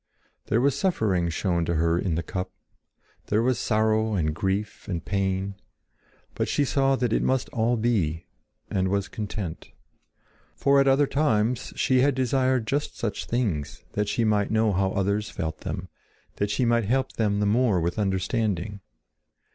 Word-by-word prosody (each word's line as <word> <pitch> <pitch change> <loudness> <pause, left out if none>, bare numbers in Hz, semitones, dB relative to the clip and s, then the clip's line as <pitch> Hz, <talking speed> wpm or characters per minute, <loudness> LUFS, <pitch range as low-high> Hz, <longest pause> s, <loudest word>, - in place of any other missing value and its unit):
There 110 - +2
was 140 0 +3
suffering 110 - +1
shown 85 0 0
to 85 - -1
her 85 +2 +2
in 90 -4 -1
the 85 - -1
cup; 90 0 -4 0.8
there 110 +2 +2
were 130 +1 +3
sorrow 110 -1 +1
and 75 -4 0
grief 95 +5 -2
and 85 -4 -3
pain. 95 -1 -1 0.8
But - - -1
she 145 - +1
saw 135 0 +2
that 125 -3 0
it - - +2
must 130 -1 0
all 115 +1 +1
be, 95 -9 0 0.4
and 95 -1 0
was 100 0 0
content. 100 -5 -5 0.9
For 140 0 +4
at 135 - +4
other 135 +2 +5
times 120 -5 +1
she 130 -1 +3
had 140 0 +3
desired 130 -1 +1
just 145 +5 -2
such 105 -4 -3
things 105 - -2
that 105 0 -1
she 115 - 0
might 105 -2 +2
know 110 -1 +2
how 95 +1 +1
others 100 +2 0
felt 80 -6 -4
them, - - -5 0.5
that 100 - 0
she 105 +5 +1
might 115 -1 +2
help 130 +4 +1
them 105 -2 0
the 105 - +1
more 110 -2 +3
with 85 +4 -1
understanding. 100 0 -1
105 Hz, 165 wpm, -26 LUFS, 95-120 Hz, 0.9 s, other